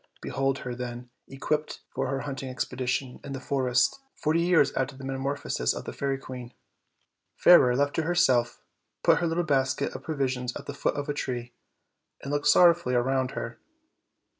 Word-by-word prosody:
Behold 135 0 -1
her, 125 - -3
then, 120 0 -6 0.2
equipped 150 +3 -3
for 135 0 -1
her 135 0 -2
hunt 140 -2 -5
ing 135 - -5
expedition 130 0 -3
in 140 - -6
the 135 - -4
forest, 130 - +1 0.2
forty 160 +2 +1
years 170 -4 +4
after 135 +1 -2
the 135 - -10
meta 135 0 -3
morphosis 135 - -1
of - - -6
the - - -6
fairy 135 -1 -1
queen. 125 -2 -9 0.8
Fairer, 125 -8 +6
left 145 +2 +1
to - - +3
herself, 160 -8 +2 0.4
put - - +5
her 170 - 0
little 165 +2 0
basket 135 -5 0
of - - -7
provi 140 -4 -1
sions 125 -1 -3
at - - -7
the 145 - -5
foot 140 - -1
of 145 -1 -3
a 145 - -1
tree, 125 -4 -4 0.7
and 140 - -4
looked 145 0 0
sorrowfully 170 -7 +5
around 130 +1 +1
her. 115 - -5
135 Hz, 185 wpm, -27 LUFS, 125-145 Hz, 0.8 s, Fairer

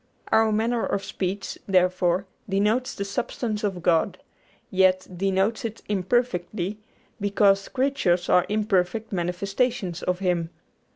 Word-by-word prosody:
Our 220 0 +4
manner 225 +2 +1
of 200 -1 -1
speech, 190 +1 -4
therefore, 185 -1 +2 0.2
denotes 210 +6 +1
the 200 - -3
substance 220 0 -3
of 190 -4 -2
God, 165 -2 +2 0.5
yet 185 -1 +3
denotes 195 +4 +1
it 225 -1 -5
imperfectly, 205 -2 -1 0.4
because 200 -1 +3
creatures 255 -10 +1
are 180 - +4
imperfect 210 0 0
manifestations 190 +2 -1
of 180 0 0
Him. 175 -3 0
195 Hz, 115 wpm, -25 LUFS, 180-215 Hz, 0.5 s, Our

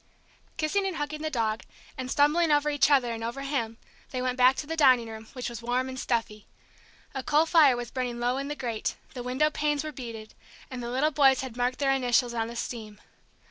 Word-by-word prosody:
Kissing 390 +6 0
and 375 - -3
hugging 300 0 -4
the 310 - -1
dog, 225 -5 -1 0.3
and 255 -1 -5
stumbling 300 +4 +3
over 295 0 +3
each 290 -1 +3
other 255 -5 +3
and 225 0 -6
over 240 +4 -4
him, 250 -5 -2 0.3
they 255 - -4
went 250 0 -1
back 255 +1 +5
to 295 - -4
the 325 +2 -4
dining 255 -6 +5
room, 220 0 -9
which 250 -2 -4
was 235 -1 -6
warm 245 +2 0
and 260 0 -6
stuffy. 225 -4 -2 0.7
A 265 - -3
coal 300 +4 +3
fire 305 -7 +5
was 240 -1 -5
burning 245 -2 -3
low 245 +2 0
in 275 +1 -3
the 295 - -3
grate, 235 -6 -3 0.2
the 250 - -6
window 260 +5 +1
panes 295 -1 0
were 310 - -5
beaded, 230 -5 -8 0.4
and 255 -1 -5
the 235 - -4
little 270 +5 +1
boys 270 -3 +4
had 260 -3 -7
marked 250 +1 0
their 275 -1 +2
initials 245 -2 +2
in 225 -1 -1
the 235 - -8
steam. 220 -3 -6
255 Hz, 220 wpm, -27 LUFS, 235-290 Hz, 0.7 s, back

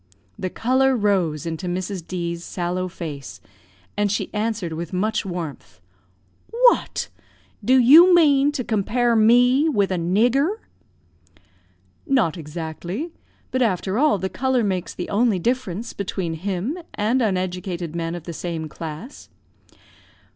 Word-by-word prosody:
The 185 - -2
colour 260 +6 +2
rose 185 - 0
into 165 +2 -4
Mrs. 185 +1 -3
D 170 -2 -3
's 170 - -10
sallow 180 +1 -3
face, 140 - -7 0.6
and 205 -1 +1
she 205 - -2
answered 210 -5 -2
with 170 +1 -5
much 210 +2 -1
warmth 155 - -6 0.7
"What! 485 +1 +2 0.5
do 255 +5 +4
you 305 +9 +8
mean 290 -4 +4
to 255 - -2
compare 235 +2 +1
me 245 +7 +5
with 200 -9 +1
a 185 - 0
nigger!" 240 - +2 1.5
"Not 230 - +2
exactly. 170 - -5 0.4
But, 260 - 0
after 195 -1 0
all, 295 -6 +4
the 190 - -2
colour 255 +3 0
makes 190 -4 -2
the 180 - -4
only 215 0 +2
difference 230 0 -2
between 185 -4 -3
him 195 - -3 0.2
and 230 +5 +1
uneducated 180 -4 -2
men 165 0 -3
of 175 - -7
the 170 - -7
same 165 -1 -4
class." 160 - -8
195 Hz, 135 wpm, -22 LUFS, 170-245 Hz, 1.5 s, you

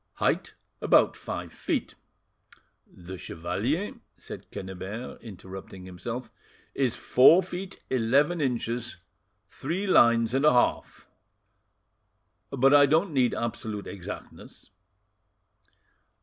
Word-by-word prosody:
"'Height - - -1 0.3
about - - +4
five - - -6
feet.' - - -2 0.9
The 90 +1 -10
chevalier," 115 - -2 0.2
said - - -10
Quennebert, 95 +5 -7
interrupting 95 -3 -10
himself, 115 +6 -6 0.4
"is 130 -4 0
four 155 +11 +6
feet 185 +2 -7
eleven 140 +7 +2
inches 120 -2 -2 0.5
three 170 +9 -4
lines 120 - +4
and 135 +2 +1
a 150 - +6
half, 125 - 0 1.4
but 135 0 +3
I 145 -1 +7
don't 160 +4 +2
need 130 -3 +2
absolute 110 -3 -4
exactness." 95 -3 -9
120 Hz, 95 wpm, -27 LUFS, 105-145 Hz, 1.4 s, I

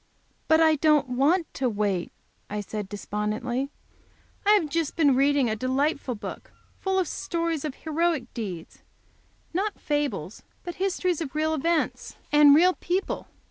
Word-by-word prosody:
"But 320 0 +5
I 315 -1 +5
don't 300 -2 +3
want 295 +8 +2
to 260 -2 0
wait," 205 -5 -1 0.4
I 210 - -3
said, 205 -1 -5
despondently. 215 +6 -3 0.8
"I 415 - +7
have 400 -7 +3
just 320 0 -2
been 290 -6 +4
reading 275 -1 +3
a 220 - 0
delightful 260 +2 -1
book, 205 - -8 0.3
full 385 0 0
of 370 -3 +1
stories 335 -3 -2
of 300 -3 -4
heroic 315 -5 -1
deeds 185 -8 -6 0.7
not 400 +4 -1
fables, 290 -1 -2 0.2
but 350 -1 -6
histories 365 -3 0
of 300 -3 -5
real 315 +1 +1
events 320 +2 -1 0.2
and 295 -1 +7
real 360 +4 +5
people. 365 +2 -2
295 Hz, 145 wpm, -26 LUFS, 250-335 Hz, 0.8 s, I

